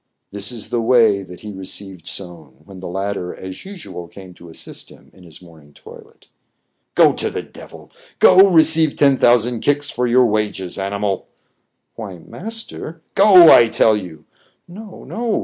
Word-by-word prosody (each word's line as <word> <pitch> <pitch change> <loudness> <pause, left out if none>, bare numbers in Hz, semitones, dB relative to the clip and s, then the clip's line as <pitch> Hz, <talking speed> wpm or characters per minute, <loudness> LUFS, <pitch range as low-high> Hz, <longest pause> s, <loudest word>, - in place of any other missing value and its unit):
This 100 +3 -4
is 115 -4 -7
the 120 - -1
way 115 -4 +3
that 90 -2 -13
he 105 - -8
received 95 -2 -8
Soun, 80 -8 -10
when 95 -2 -13
the 95 - -8
latter 95 0 -4
as 95 - -10
usual 175 - -10
came 95 +1 -14
to 85 -1 -15
assist 80 - -10
him - - -19
in 95 - -19
his 85 +1 -16
morning 80 -4 -18
toilet. - - -16 0.7
"Go - - +5
to - - -3
the - - -6
devil! - - -15 0.3
Go, 190 +2 +6
receive 160 -2 +4
ten 140 -2 +3
thousand 120 0 +2
kicks 145 +2 0
for 125 +1 -2
your 125 +1 +4
wages, 105 -4 -3
animal! 100 0 -3
" - - -49
" - - -55
Why, 100 -5 -8
master 180 - -8
" - - -47
— - - -45
" - - -49
Go, 190 -5 +7
I 115 -1 +6
tell 110 -1 +3
you! 90 -6 -8 0.2
" - - -42
"No, 205 +3 -12
no!" 230 -1 -3
105 Hz, 185 wpm, -18 LUFS, 95-145 Hz, 0.7 s, Go